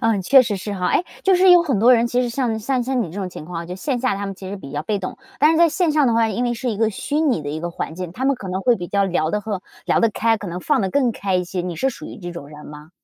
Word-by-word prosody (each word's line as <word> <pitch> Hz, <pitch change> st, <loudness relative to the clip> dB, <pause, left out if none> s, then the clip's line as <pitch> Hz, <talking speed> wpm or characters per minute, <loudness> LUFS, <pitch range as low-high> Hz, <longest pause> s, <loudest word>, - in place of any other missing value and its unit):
啊， 225 Hz, -3 st, +2 dB
确 260 Hz, +8 st, +6 dB
实 215 Hz, -5 st, -2 dB
是 205 Hz, +2 st, -5 dB
哈。 180 Hz, -1 st, -1 dB
诶， -, -, +3 dB, 0.2 s
就 385 Hz, -, +4 dB
是 365 Hz, +1 st, +5 dB
有 355 Hz, -1 st, +8 dB
很 275 Hz, -10 st, 0 dB
多 240 Hz, +5 st, +6 dB
人 235 Hz, 0 st, +2 dB
其 245 Hz, +1 st, 0 dB
实 250 Hz, -, 0 dB
像 235 Hz, -2 st, -1 dB
像 250 Hz, +3 st, -1 dB
像 255 Hz, +1 st, -1 dB
你 210 Hz, -, -2 dB
这 -, -, -12 dB
种 190 Hz, -, -3 dB
情 175 Hz, -, -9 dB
况， 170 Hz, 0 st, -6 dB
就 180 Hz, -, -6 dB
线 250 Hz, +7 st, -2 dB
下 255 Hz, -3 st, 0 dB
他 200 Hz, +1 st, -4 dB
们 195 Hz, -, -5 dB
其 190 Hz, 0 st, -9 dB
实 200 Hz, -, -5 dB
比 140 Hz, -8 st, -10 dB
较 145 Hz, +1 st, -3 dB
被 205 Hz, +6 st, -1 dB
动， 185 Hz, -, -6 dB, 0.2 s
但 300 Hz, -, +5 dB
是 325 Hz, -, +1 dB
在 340 Hz, 0 st, +5 dB
线 350 Hz, +1 st, +1 dB
上 295 Hz, -3 st, +3 dB
的 235 Hz, -, +2 dB
话， 230 Hz, 0 st, +3 dB
因 225 Hz, +3 st, -1 dB
为 240 Hz, -, 0 dB
是 240 Hz, +1 st, -2 dB
一 215 Hz, -, -3 dB
个 220 Hz, +1 st, +1 dB
虚 285 Hz, +7 st, -4 dB
拟 280 Hz, -, +1 dB
的 145 Hz, -, -5 dB
一 150 Hz, +2 st, -3 dB
个 175 Hz, +2 st, -4 dB
环 160 Hz, -, -5 dB
境， 180 Hz, -1 st, -6 dB
他 255 Hz, +7 st, -4 dB
们 275 Hz, -, +3 dB
可 205 Hz, -6 st, -8 dB
能 185 Hz, +1 st, -2 dB
会 240 Hz, +3 st, +3 dB
比 175 Hz, -, -6 dB
较 200 Hz, +2 st, +1 dB
聊 170 Hz, -4 st, 0 dB
得 210 Hz, -, -1 dB
和 205 Hz, -3 st, -4 dB, 0.2 s
聊 -, -, +3 dB
得 230 Hz, -, +3 dB
开， 225 Hz, +1 st, +1 dB
可 205 Hz, -, -8 dB
能 175 Hz, 0 st, -5 dB
放 290 Hz, +7 st, +1 dB
得 190 Hz, -, -1 dB
更 260 Hz, -1 st, +2 dB
开 200 Hz, -4 st, -2 dB
一 180 Hz, -, 0 dB
些， 180 Hz, 0 st, -4 dB
你 175 Hz, -1 st, -4 dB
是 265 Hz, -, 0 dB
属 260 Hz, -, -8 dB
于 -, -, -9 dB
这 175 Hz, -2 st, -6 dB
种 170 Hz, -5 st, -9 dB
人 150 Hz, 0 st, -12 dB
吗？ 150 Hz, +1 st, -12 dB
210 Hz, 375 characters per minute, -21 LUFS, 180-250 Hz, 0.2 s, 有